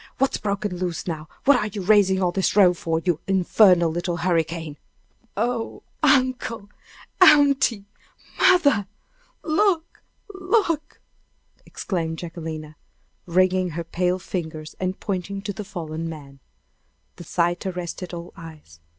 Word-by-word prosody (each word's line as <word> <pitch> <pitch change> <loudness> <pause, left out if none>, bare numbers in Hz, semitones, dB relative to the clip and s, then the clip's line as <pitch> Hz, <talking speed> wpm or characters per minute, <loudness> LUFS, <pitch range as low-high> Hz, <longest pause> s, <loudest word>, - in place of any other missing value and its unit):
What's 270 +1 +1
broke 200 0 -2
loose 180 -3 -3
now? 160 -3 -5 0.2
What 285 -1 +6
are 210 - -1
you 205 -2 -6
raising 190 -1 +4
all 180 - +2
this 190 +1 0
row 190 -4 +6
for, 165 -1 -2
you 175 -4 +1
infernal 185 -2 +4
little 175 +1 -2
hurricane?" 165 -3 -1 0.6
"Oh, 230 +1 -2 0.2
uncle! 255 -6 +1 0.5
aunty! 280 - +5 0.5
mother! 285 - +4 0.6
look 335 0 0 0.3
look!" 370 -5 -1 0.7
exclaimed 165 -4 -3
Jacquelina, 160 -3 -7 0.5
wringing 185 +1 +2
her 170 +1 -4
pale 180 +2 -1
fingers, 160 -4 -6
and 185 0 -3
pointing 195 0 -3
to 205 - -4
the 210 - -6
fallen 165 -5 -5
man. 140 -4 -10 0.8
The - - -9
sight 175 +3 -1
arrested 180 0 -5
all 170 0 -8
eyes. 155 - -13
185 Hz, 125 wpm, -23 LUFS, 165-215 Hz, 0.8 s, What